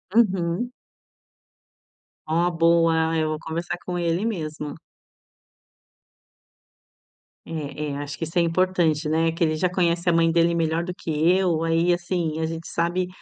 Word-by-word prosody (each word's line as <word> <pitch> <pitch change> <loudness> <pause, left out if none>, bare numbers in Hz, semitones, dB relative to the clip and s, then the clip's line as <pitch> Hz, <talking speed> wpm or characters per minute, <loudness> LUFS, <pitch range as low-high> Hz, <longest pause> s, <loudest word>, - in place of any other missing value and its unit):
Uhum. 195 0 +2 1.6
Oh, 170 +3 +1
boa, 165 -1 +3
ah, 165 - 0
eu 155 -1 +1
vou 155 0 -3
conversar 170 +2 -4
com 180 -1 -3
ele 170 +3 0
mesmo. 155 -8 -4 2.7
É, 150 -2 -5
é 140 - -4
acho 145 0 -6
que 165 - -3
isso 165 +2 -6
é - - +6
importante, 170 -2 +1
né, 165 +1 +2
que 165 +1 -1
ele 155 -1 +2
já 180 +3 +1
conhece 175 -1 +1
a - - +3
mãe 165 0 +4
dele 170 0 +3
melhor 165 0 0
do 180 +1 -4
que 175 - -9 0.2
eu, 180 -4 +2
aí, 165 +2 +2
assim, 175 -2 -2
a 160 - 0
gente 165 +1 -5
sabe 175 +2 -1
165 Hz, 155 wpm, -24 LUFS, 160-175 Hz, 2.7 s, é